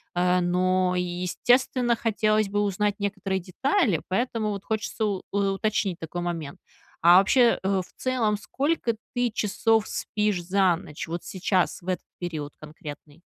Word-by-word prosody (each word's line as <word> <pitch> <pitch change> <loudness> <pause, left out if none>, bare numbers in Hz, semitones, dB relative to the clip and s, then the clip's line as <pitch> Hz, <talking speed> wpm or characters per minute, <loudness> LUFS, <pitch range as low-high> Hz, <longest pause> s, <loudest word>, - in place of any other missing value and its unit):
э, 180 +1 +3
но, 180 +1 +1
естественно, 235 +8 +1
хотелось 215 -1 +1
бы 205 +1 0
узнать 205 0 0
некоторые 195 -1 -2
детали, 210 - +1
поэтому 220 +1 -1
вот 200 -1 -5
хочется 220 0 -2
у 195 -3 -1
уточнить 200 -1 0
такой 170 +2 -5
момент: 165 -5 -4 0.4
а 175 +2 +8
вообще, 235 +5 +4
э, 190 -1 +1
в - - -22
целом 235 -5 +1
сколько 270 +1 -1 0.2
ты 245 -2 +1
часов 215 +1 +1
спишь 210 -4 -1
за 185 -1 +3
ночь, 150 -2 -8
вот 170 +1 -4
сейчас, 185 -1 0
в 175 - -16
этот 185 - -2
период 155 -5 -5
конкретный? 150 0 -11
195 Hz, 145 wpm, -26 LUFS, 175-215 Hz, 0.4 s, а